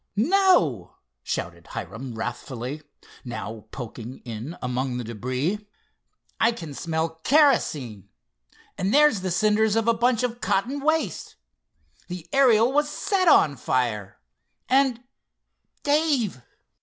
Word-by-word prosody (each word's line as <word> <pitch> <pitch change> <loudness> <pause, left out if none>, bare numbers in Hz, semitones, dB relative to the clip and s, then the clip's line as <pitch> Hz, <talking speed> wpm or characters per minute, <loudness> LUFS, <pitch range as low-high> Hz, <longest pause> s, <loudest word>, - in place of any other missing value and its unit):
"No!" 220 - +3 0.3
shouted 85 +6 -5
Hiram 115 +7 -7
wrathfully, 125 +4 -5 0.4
now 110 -3 -6
poking 120 0 -8
in 120 +7 -6
among 125 0 -2
the 125 - -3
debris. 130 - -2 0.8
"I 230 +1 +4
can 165 -10 -8
smell 160 +1 -3
kerosene. 150 - +2 0.7
And 195 +6 +1
there's 295 -9 +5
the 185 - -2
cinders 215 +3 +2
of 225 0 +1
a 230 - +5
bunch 235 +1 +1
of 240 -1 -2
cotton 250 +9 0
waste. 305 - -1 0.7
The 180 -2 -7
Ariel 250 -3 +5
was 295 +1 +2
set 370 +5 0
on 145 - +5
fire! 105 -6 -1 0.5
And—Dave!" 265 - -1
180 Hz, 110 wpm, -25 LUFS, -, 0.8 s, there's